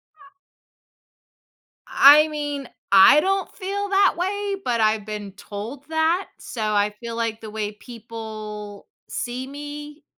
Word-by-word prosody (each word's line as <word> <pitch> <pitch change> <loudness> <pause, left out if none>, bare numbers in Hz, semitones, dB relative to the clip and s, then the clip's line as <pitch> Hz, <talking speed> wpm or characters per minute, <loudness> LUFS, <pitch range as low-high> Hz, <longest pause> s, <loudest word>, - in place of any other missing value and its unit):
I 380 -1 -21 1.5
I 300 +3 +8
mean, 290 -3 -4 0.2
I 195 +9 +8
don't 390 +3 -1
feel 400 +1 -3
that 390 0 +4
way, 400 +2 -1
but 235 -2 0
I've 215 -1 +2
been 210 -2 -6
told 215 +8 -8
that, 320 +4 +1
so 230 - -7
I 210 -1 +1
feel 230 -1 -6
like 230 -1 -2
the 220 - -8
way 210 -1 -3
people 215 -2 -9 0.2
see 255 +1 -4
me 295 +1 -8
255 Hz, 130 wpm, -23 LUFS, 215-320 Hz, 1.5 s, I